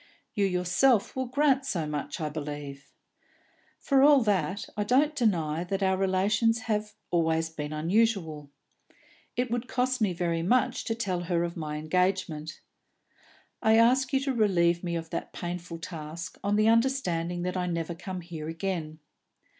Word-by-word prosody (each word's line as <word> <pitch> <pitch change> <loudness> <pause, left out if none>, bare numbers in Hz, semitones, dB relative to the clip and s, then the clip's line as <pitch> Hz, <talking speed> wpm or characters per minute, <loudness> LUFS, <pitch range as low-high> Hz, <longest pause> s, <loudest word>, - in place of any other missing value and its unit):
You 205 - +1
yourself 185 +6 +2
will 260 -1 -2
grant 275 +1 +2
so 180 - -2
much, 150 +3 -4
I 155 - -1
believe. 145 -2 -6 0.9
For 275 -2 +2
all 285 -2 +7
that, 200 -2 0
I 210 - 0
don't 280 +8 +2
deny 170 - +1
that 195 +2 -2
our 190 0 +3
relations 200 +4 +2
have 215 -1 -2 0.2
always 160 -1 +1
been 150 -2 -5
unusual; 165 -3 0 0.4
and - - -30 0.4
it 250 -1 -1
would 240 +1 -2
cost 255 +1 0
me 205 -3 +3
very 170 -1 -1
much 245 +9 +1
to 225 - -1
tell 185 -6 -2
her 170 0 +1
of 170 0 -3
my 155 -3 -4
engagement. 160 -1 -1 1.0
I 220 0 +5
ask 255 +3 +4
you 270 - +3
to 275 -1 -1
relieve 175 -6 +2
me 170 -1 -2
of 165 -1 -5
the - - -3
painful 175 -1 -5
task, 165 +1 -7
on 205 0 +1
the 215 +1 +3
understanding 185 -8 +1
that 180 +1 -2
I 180 -1 -1
never 170 -1 -2
come 185 +1 -6
here 165 -3 -7
again. 165 -2 -3
180 Hz, 160 wpm, -28 LUFS, 165-225 Hz, 1.0 s, all